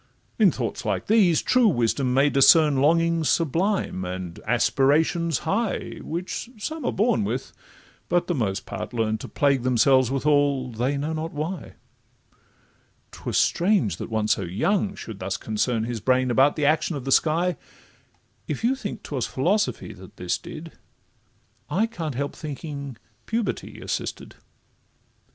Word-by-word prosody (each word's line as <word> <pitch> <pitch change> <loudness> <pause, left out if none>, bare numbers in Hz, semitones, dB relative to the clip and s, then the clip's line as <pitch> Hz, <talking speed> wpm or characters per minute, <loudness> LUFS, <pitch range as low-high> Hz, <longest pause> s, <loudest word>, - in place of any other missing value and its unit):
In - - +7
thoughts - - -4
like - - -2
these 200 -7 +4
true 255 -2 +4
wisdom 125 - +1
may 135 +3 +3
discern 145 +1 +6
Longings 165 +2 +2
sublime, 170 - 0
and 90 -1 -6
aspirations 160 +3 +2
high, 225 +3 -1
Which 180 +7 -5
some 315 +9 -5
are - - +1
born 200 - +1
with, 120 +6 -3 0.6
but 175 0 +2
the 175 - -1
most 105 - -2
part - - -6
learn 110 -1 0
To - - -7
plague 140 -3 +1
themselves 130 +1 +3
withal, 140 -1 +1
they 125 +5 -1
know 150 +3 -2
not 160 +1 -4
why: 155 +3 -5 1.4
'Twas - - -3
strange 175 - +2
that - - -6
one 110 -1 -1
so 110 - +2
young 195 - 0
should 110 -3 -8
thus 95 +1 -3
concern 110 +1 -1
His 115 0 -3
brain 130 +3 +2
about 135 +4 +4
the 150 - 0
action 155 +2 +2
of 135 -3 -6
the 135 - -2
sky; 170 +5 +3 0.9
If - - -4
you 245 +3 +3
think 260 -6 -6
'twas 130 -5 -3
philosophy 190 +11 0
that - - -14
this - - -2
did, - - -9 1.0
I 220 - +2
can't 165 - -5
help 140 +2 -3
thinking 140 -4 -6 0.3
puberty 225 -1 -3
assisted. - - -4
145 Hz, 145 wpm, -24 LUFS, 125-170 Hz, 1.4 s, In